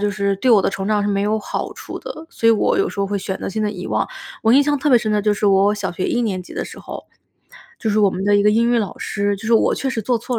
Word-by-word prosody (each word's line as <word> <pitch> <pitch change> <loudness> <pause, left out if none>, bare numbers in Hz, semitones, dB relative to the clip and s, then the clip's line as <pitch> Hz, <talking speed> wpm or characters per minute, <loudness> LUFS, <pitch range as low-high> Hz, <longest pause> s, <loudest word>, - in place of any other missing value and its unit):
就 205 0 0
是 200 0 0
对 255 +6 +1
我 215 -4 +6
的 - - +1
成 195 0 -4
长 210 -1 +2
是 205 - -1
没 200 -1 0
有 215 +2 +1
好 210 - -4
处 - - -8
的， 315 +1 -8
所 230 - -2
以 - - +8
我 220 - +2
有 395 - +2
时 - - -11
候 200 - +1
会 205 +1 -2
选 190 0 -4
择 - - -4
性 215 +3 -3
地 210 - 0
遗 185 -3 -7
忘。 - - -1 0.3
我 225 - +4
印 270 - +7
象 290 0 +1
特 295 - 0
别 245 - +7
深 215 -2 -2
的 210 -1 +1
就 210 0 +2
是 210 - -1
我 200 +1 +4
小 200 -3 -4
学 180 - -3
一 245 - 0
年 190 -5 -2
级 - - -13
的 - - -3
时 - - -10
候， - - -8 0.7
就 220 - -1
是 210 - +1
我 205 -2 +5
们 185 +1 -4
的 205 0 +4
一 205 - +3
个 210 - +5
英 230 +2 +2
语 240 - +3
老 205 -6 -3
师， 205 0 -1
就 195 - -13
是 235 - +1
我 225 - +3
确 270 - -2
实 230 - -2
做 245 +3 +1
错 240 +1 -3
210 Hz, 360 characters per minute, -20 LUFS, 200-230 Hz, 0.7 s, 以